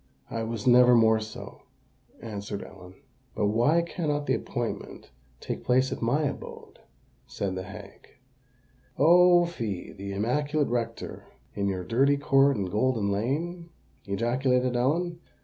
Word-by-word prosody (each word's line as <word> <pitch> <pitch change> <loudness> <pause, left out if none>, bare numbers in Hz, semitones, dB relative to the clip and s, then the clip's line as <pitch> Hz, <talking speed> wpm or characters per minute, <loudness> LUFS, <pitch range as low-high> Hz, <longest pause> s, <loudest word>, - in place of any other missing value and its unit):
"I 115 - -2
was 115 -1 -4
never 125 0 +7
more 110 -1 +4
so," 110 0 -9 0.6
answered 100 -2 -5
Ellen. 90 +1 -13 0.4
"But 105 -2 +1
why 145 +10 +3
cannot 150 -4 -2
the 130 - +1
appointment 120 - -5 0.3
take - - -5
place 130 +1 +2
at - - -5
my 125 +7 +1
abode?" 145 - -6 0.5
said 95 -2 -3
the 95 - -4
hag. 95 +1 -11 0.9
"Oh! 175 +3 +6
fie—the 100 - -5
immaculate 145 +9 0
rector 115 -1 -4 0.3
in 100 -1 -2
your 95 -2 -2
dirty 135 +8 +2
court 140 -2 +3
in 100 - -1
Golden 105 +1 0
Lane!" 165 - -2 0.4
ejaculated 125 +4 0
Ellen. 165 +8 0
120 Hz, 130 wpm, -27 LUFS, 105-145 Hz, 0.9 s, never